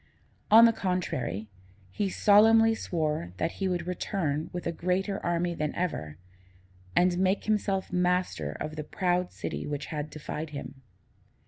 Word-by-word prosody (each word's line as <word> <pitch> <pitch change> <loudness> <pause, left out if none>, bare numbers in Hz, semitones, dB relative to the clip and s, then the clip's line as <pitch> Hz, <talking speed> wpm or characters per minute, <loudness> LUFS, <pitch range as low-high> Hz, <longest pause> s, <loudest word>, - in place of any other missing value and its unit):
On 225 +2 +9
the 230 - +5
contrary, 170 - -2 0.4
he 200 - -1
solemnly 225 +3 +5
swore 155 - -2
that 165 - -1
he 190 - +2
would 175 -2 -1
return 165 -4 -2
with 180 - -5
a 170 - 0
greater 185 +4 -1
army 175 0 0
than 150 -2 -3
ever, 75 - -3 0.8
and 180 0 +3
make 190 +1 +2
himself 200 -3 0
master 180 - 0
of 155 +1 -6
the 155 - -3
proud 180 +2 0
city - - -5
which 145 -1 -3
had 150 0 -3
defied 155 +1 -6
him. 140 -2 -8
175 Hz, 145 wpm, -28 LUFS, 150-190 Hz, 0.8 s, On